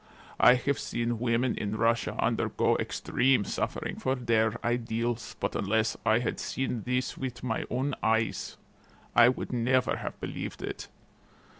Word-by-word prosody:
I 125 Hz, -, +8 dB
have 140 Hz, +3 st, -1 dB
seen 120 Hz, -1 st, -2 dB
women 120 Hz, +1 st, +1 dB
in 105 Hz, 0 st, -3 dB
Russia 115 Hz, +1 st, +1 dB
undergo -, -, +1 dB
extreme 130 Hz, -5 st, +1 dB
suffering -, -, -3 dB
for 130 Hz, 0 st, 0 dB
their 115 Hz, -3 st, +1 dB
ideals, 120 Hz, -1 st, -1 dB
but -, -, -2 dB
unless 110 Hz, +2 st, +1 dB
I 110 Hz, -, +4 dB
had 120 Hz, 0 st, -2 dB
seen 130 Hz, -3 st, -2 dB
this 125 Hz, 0 st, -1 dB
with 130 Hz, -3 st, -5 dB
my 115 Hz, -3 st, -1 dB
own 135 Hz, +3 st, -1 dB
eyes 110 Hz, 0 st, 0 dB, 0.6 s
I 120 Hz, -, +8 dB
never 125 Hz, 0 st, +1 dB
would -, -, -1 dB
have -, -, -6 dB
believed -, -, -5 dB
it. -, -, -5 dB
120 Hz, 145 wpm, -29 LUFS, 110-125 Hz, 0.6 s, I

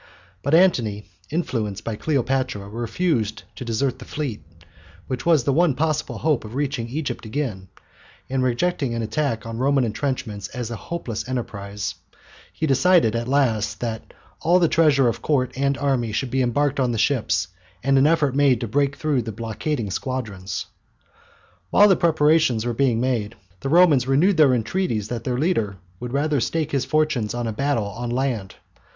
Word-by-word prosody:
But 140 Hz, +3 st, +2 dB
Antony, 120 Hz, -, +3 dB, 0.2 s
influenced 110 Hz, -, -2 dB
by 115 Hz, -, -3 dB
Cleopatra, 130 Hz, -6 st, -1 dB
refused 115 Hz, -, -1 dB
to -, -, -6 dB
desert 125 Hz, +3 st, -1 dB
the 125 Hz, -, -10 dB
fleet, 130 Hz, -, -4 dB, 0.6 s
which 130 Hz, +3 st, -4 dB
was 160 Hz, -6 st, +5 dB
the 140 Hz, -, +1 dB
one 165 Hz, -2 st, +3 dB
possible 155 Hz, 0 st, -1 dB
hope 150 Hz, -6 st, +1 dB
of 110 Hz, +2 st, -9 dB
reaching 135 Hz, -5 st, -2 dB
Egypt 135 Hz, -2 st, -3 dB
again, 110 Hz, -6 st, -4 dB, 0.6 s
and 130 Hz, 0 st, -1 dB
rejecting 130 Hz, +1 st, 0 dB
an 115 Hz, -, -2 dB
attack 115 Hz, -1 st, -1 dB
on 115 Hz, 0 st, -5 dB
the 125 Hz, -, -2 dB
Roman 140 Hz, -1 st, +3 dB
entrenchments 110 Hz, -4 st, -3 dB
as 120 Hz, -2 st, -4 dB
a -, -, -3 dB
hopeless 125 Hz, -5 st, -5 dB
enterprise, 105 Hz, -5 st, -4 dB, 0.6 s
he 160 Hz, -, -2 dB
decided 155 Hz, -4 st, +4 dB
at 115 Hz, +1 st, -2 dB
last 125 Hz, -6 st, +1 dB
that 115 Hz, -2 st, -4 dB, 0.3 s
all 175 Hz, +3 st, +4 dB
the 175 Hz, -2 st, +4 dB
treasure 150 Hz, -6 st, +4 dB
of 115 Hz, -, -1 dB
Court 130 Hz, -5 st, +1 dB
and 140 Hz, +1 st, 0 dB
army 130 Hz, -5 st, 0 dB
should 125 Hz, +4 st, -2 dB
be 130 Hz, -, +1 dB
embarked 140 Hz, +3 st, +1 dB
on 125 Hz, -2 st, +1 dB
the -, -, -2 dB
ships, 110 Hz, -, +1 dB, 0.3 s
and 135 Hz, +1 st, +3 dB
an 140 Hz, -, +5 dB
effort 155 Hz, -4 st, +2 dB
made 140 Hz, -4 st, +4 dB
to 120 Hz, -, -2 dB
break 140 Hz, +5 st, +1 dB
through 145 Hz, -5 st, 0 dB
the 110 Hz, -1 st, -5 dB
blockading 115 Hz, +2 st, -3 dB
squadrons. 110 Hz, -7 st, -4 dB, 1.0 s
While 205 Hz, -, +6 dB
the 190 Hz, -, +6 dB
preparations 155 Hz, -8 st, +3 dB
were 120 Hz, -, -1 dB
being 120 Hz, -1 st, +2 dB
made, 115 Hz, -4 st, -1 dB, 0.2 s
the 135 Hz, -, -3 dB
Romans 155 Hz, -6 st, +5 dB
renewed 160 Hz, +8 st, +3 dB
their 140 Hz, -5 st, +6 dB
entreaties 115 Hz, -, -1 dB
that 115 Hz, -2 st, -4 dB
their 125 Hz, -1 st, -1 dB
leader 115 Hz, -, 0 dB, 0.2 s
would 125 Hz, -1 st, -5 dB
rather 145 Hz, +1 st, +1 dB
stake 155 Hz, +5 st, -1 dB
his 140 Hz, -2 st, 0 dB
fortunes 150 Hz, -8 st, 0 dB
on 120 Hz, 0 st, -2 dB
a 110 Hz, -, -2 dB
battle 135 Hz, -2 st, 0 dB
on 115 Hz, +4 st, -5 dB
land. 120 Hz, -6 st, -2 dB
130 Hz, 175 wpm, -23 LUFS, 115-145 Hz, 1.0 s, While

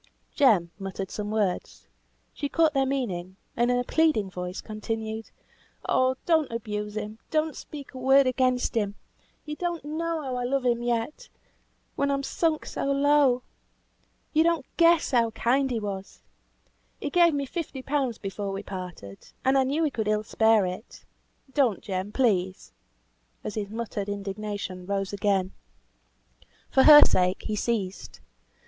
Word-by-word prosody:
Jem 205 Hz, -, +4 dB
muttered 195 Hz, -1 st, -5 dB
some 210 Hz, -1 st, -4 dB
words; 210 Hz, -4 st, -2 dB, 0.5 s
she 285 Hz, -, -3 dB
caught 320 Hz, -1 st, +3 dB
their 270 Hz, -1 st, +2 dB
meaning, 190 Hz, -10 st, -3 dB, 0.2 s
and 240 Hz, +1 st, +2 dB
in 245 Hz, -, +3 dB
a 245 Hz, -, +1 dB
pleading 275 Hz, -10 st, +2 dB
voice 180 Hz, 0 st, -5 dB
continued, 220 Hz, 0 st, -5 dB, 0.6 s
"Oh, 260 Hz, 0 st, +3 dB
don't 320 Hz, -5 st, +2 dB
abuse 210 Hz, -2 st, -4 dB
him; 215 Hz, +1 st, -5 dB
don't 310 Hz, -1 st, 0 dB
speak 285 Hz, -2 st, -9 dB
a 260 Hz, -, -8 dB
word 270 Hz, +2 st, +5 dB
against 255 Hz, -1 st, +1 dB
him! 205 Hz, -3 st, -1 dB, 0.5 s
You 300 Hz, 0 st, -5 dB
don't 345 Hz, -2 st, -3 dB
know 320 Hz, +1 st, -2 dB
how 260 Hz, -2 st, -3 dB
I 245 Hz, -, -2 dB
love 260 Hz, +1 st, 0 dB
him 240 Hz, -1 st, +2 dB
yet; 240 Hz, -1 st, +2 dB
yet, -, -, -17 dB, 0.7 s
when 280 Hz, -, 0 dB
I 280 Hz, -, +2 dB
am 275 Hz, -, -3 dB
sunk 315 Hz, +2 st, 0 dB
so -, -, -4 dB
low. 275 Hz, -2 st, +3 dB, 0.9 s
You 315 Hz, -, +4 dB
don't 335 Hz, 0 st, +1 dB
guess 335 Hz, -2 st, +4 dB
how 235 Hz, -3 st, +3 dB
kind 255 Hz, +5 st, +1 dB
he 240 Hz, -3 st, -1 dB
was. 195 Hz, -2 st, -6 dB, 0.8 s
He 290 Hz, -, -4 dB
gave 340 Hz, -2 st, +5 dB
me 280 Hz, -1 st, -1 dB
fifty 275 Hz, -3 st, -5 dB
pound 270 Hz, -5 st, -1 dB
before 195 Hz, 0 st, -4 dB
we 195 Hz, +1 st, -5 dB
parted, 180 Hz, -, -8 dB
and 265 Hz, +1 st, +4 dB
I 270 Hz, -, +5 dB
knew 285 Hz, +5 st, 0 dB
he 305 Hz, -, +1 dB
could 220 Hz, -4 st, -2 dB
ill 215 Hz, 0 st, +1 dB
spare 220 Hz, -1 st, +3 dB
it. 185 Hz, +5 st, -7 dB, 0.5 s
Don't, 255 Hz, -9 st, +2 dB
Jem, 190 Hz, +1 st, -3 dB
please," 190 Hz, -7 st, 0 dB, 0.7 s
as -, -, -4 dB
his 205 Hz, -2 st, -3 dB
muttered 215 Hz, -2 st, -4 dB
indignation 200 Hz, -2 st, -5 dB
rose 195 Hz, 0 st, -2 dB
again. 195 Hz, -2 st, +1 dB, 1.2 s
For 265 Hz, -, +5 dB
her 295 Hz, -1 st, +11 dB
sake 180 Hz, 0 st, +1 dB
he 215 Hz, -, -2 dB
ceased. 205 Hz, -4 st, -3 dB
235 Hz, 160 wpm, -26 LUFS, 200-280 Hz, 1.2 s, her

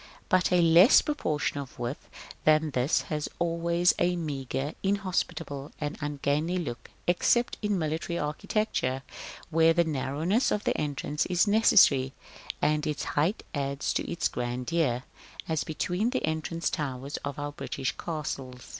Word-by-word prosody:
But 185 Hz, 0 st, +3 dB
a 180 Hz, -1 st, +5 dB
less 170 Hz, -, +7 dB
proportion 155 Hz, -, -1 dB
of 135 Hz, -2 st, -8 dB
width 120 Hz, +3 st, -5 dB, 0.3 s
than 155 Hz, 0 st, +4 dB
this 130 Hz, +3 st, +1 dB
has 150 Hz, -1 st, -2 dB
always 170 Hz, +1 st, +2 dB
a 180 Hz, +1 st, +2 dB
meagre, 140 Hz, -3 st, -3 dB
inhospitable, 180 Hz, -7 st, -2 dB
and 150 Hz, -1 st, -3 dB
ungainly 145 Hz, +4 st, -1 dB
look 145 Hz, -9 st, -5 dB, 0.2 s
except 235 Hz, +7 st, +2 dB
in 210 Hz, -2 st, 0 dB
military 160 Hz, +1 st, -2 dB
architecture, 150 Hz, -, -1 dB, 0.5 s
where 165 Hz, 0 st, +5 dB
the 170 Hz, 0 st, +3 dB
narrowness 160 Hz, -, 0 dB
of 210 Hz, -, -1 dB
the -, -, 0 dB
entrance 150 Hz, 0 st, -2 dB
is 180 Hz, +1 st, +3 dB
necessary, 185 Hz, -11 st, +5 dB, 0.5 s
and 150 Hz, 0 st, +2 dB
its 150 Hz, -2 st, -2 dB
height 165 Hz, +9 st, +1 dB
adds 140 Hz, -1 st, -1 dB
to -, -, -2 dB
its 170 Hz, -, 0 dB
grandeur, 125 Hz, +2 st, -1 dB, 0.4 s
as 160 Hz, -2 st, 0 dB
between 180 Hz, +7 st, -1 dB
the 260 Hz, -, -1 dB
entrance 160 Hz, +1 st, -2 dB
towers 135 Hz, -1 st, -3 dB
of 140 Hz, -1 st, -5 dB
our 145 Hz, 0 st, -3 dB
British 135 Hz, -2 st, -3 dB
castles. 135 Hz, -6 st, -5 dB
155 Hz, 140 wpm, -28 LUFS, 140-175 Hz, 0.5 s, less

